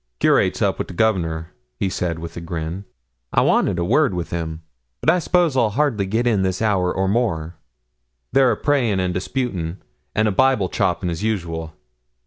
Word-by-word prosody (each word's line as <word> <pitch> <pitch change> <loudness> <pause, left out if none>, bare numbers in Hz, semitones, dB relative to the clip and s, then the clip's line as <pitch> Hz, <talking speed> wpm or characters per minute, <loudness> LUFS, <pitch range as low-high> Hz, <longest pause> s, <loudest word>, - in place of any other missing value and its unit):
'Curate's - - +3
up - - +1
wi' - - -1
the - - -9
Governor,' 85 -6 0 0.2
he 95 - 0
said, 90 -3 -2
with 85 0 -7
a 85 - -6
grin. 85 +3 -5 0.5
'I - - +4
wanted - - +2
a 85 - 0
word 130 - +3
wi' 90 - -1
him; 80 -1 -5 0.4
but 160 - +3
I 180 - +2
s'pose 170 -2 +2
I'll 120 -4 +3
hardly 115 -4 0
git 115 +5 0
in 110 -5 +2
this 95 -1 0
hour 100 -5 +1
or 95 0 0
more; 90 -7 -1 0.7
they're 135 -2 +4
a 110 - -1
praying 125 -9 +1
and 90 -1 0
disputing, 90 -4 -3 0.4
and 110 +1 +3
a - - +2
Bible 110 -3 +3
chopping, 90 - 0
as 85 - -4
usual. 85 -7 -3
95 Hz, 185 wpm, -21 LUFS, 85-115 Hz, 0.7 s, I